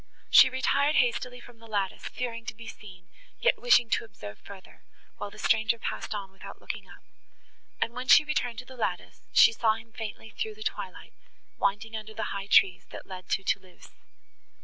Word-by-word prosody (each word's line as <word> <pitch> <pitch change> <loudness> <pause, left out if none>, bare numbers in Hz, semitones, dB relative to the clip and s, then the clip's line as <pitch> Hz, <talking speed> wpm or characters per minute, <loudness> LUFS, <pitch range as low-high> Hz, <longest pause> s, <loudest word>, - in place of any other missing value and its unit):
She - - +9
retired 280 +3 +1
hastily 245 0 +1
from 245 -1 -15
the 230 - -14
lattice, 200 -3 -2
fearing 230 -2 -4
to - - -4
be 230 +1 -11
seen, 185 -5 -12 0.3
yet - - +2
wishing 460 - +5
to - - +2
observe 105 - -10
further, 195 -2 -14 0.3
while 205 - -5
the 205 - -15
stranger 220 +1 +2
passed 225 - -4
on 195 -2 -6
without 195 - -11
looking - - -6
up, - - -15 0.8
and, 230 - -1
when 250 +1 -6
she 305 - +8
returned 245 -6 -1
to 250 - -7
the 260 - -12
lattice, 200 -7 -3
she - - +7
saw 220 -1 +2
him 225 0 -12
faintly 220 -1 -7
through 435 -1 -4
the 435 - -8
twilight, - - -5 0.5
winding 210 +3 0
under 215 0 -7
the 220 - -3
high 200 0 -5
trees, 195 -2 +4
that - - -9
led 185 -1 -9
to 195 - 0
Thoulouse. 190 -2 -3
225 Hz, 190 wpm, -28 LUFS, 200-245 Hz, 0.8 s, She